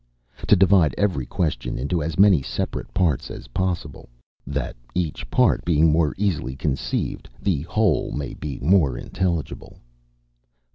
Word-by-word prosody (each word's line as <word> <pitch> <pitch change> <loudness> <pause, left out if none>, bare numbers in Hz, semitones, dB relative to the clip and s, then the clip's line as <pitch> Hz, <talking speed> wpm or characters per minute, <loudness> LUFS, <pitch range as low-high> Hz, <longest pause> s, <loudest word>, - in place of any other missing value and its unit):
To - - +7
divide 95 -6 +4
every 90 -12 0
question 75 -9 -2
into 70 +7 -1
as 80 +1 -3
many 95 -6 +6
separate 65 - -4
parts 85 -8 0
as - - -9
possible, 85 -3 -3 0.4
that 70 -1 -3 0.2
each 85 -4 -2
part - - +3
being 80 -1 +3
more 80 -2 +2
easily 90 -10 -1
conceived, 70 0 -2
the 90 -8 0
whole 105 -6 +1
may 70 -1 -4
be 75 -3 -6
more 75 -5 +3
intelligible. 85 -5 -3
80 Hz, 135 wpm, -23 LUFS, 70-95 Hz, 0.4 s, To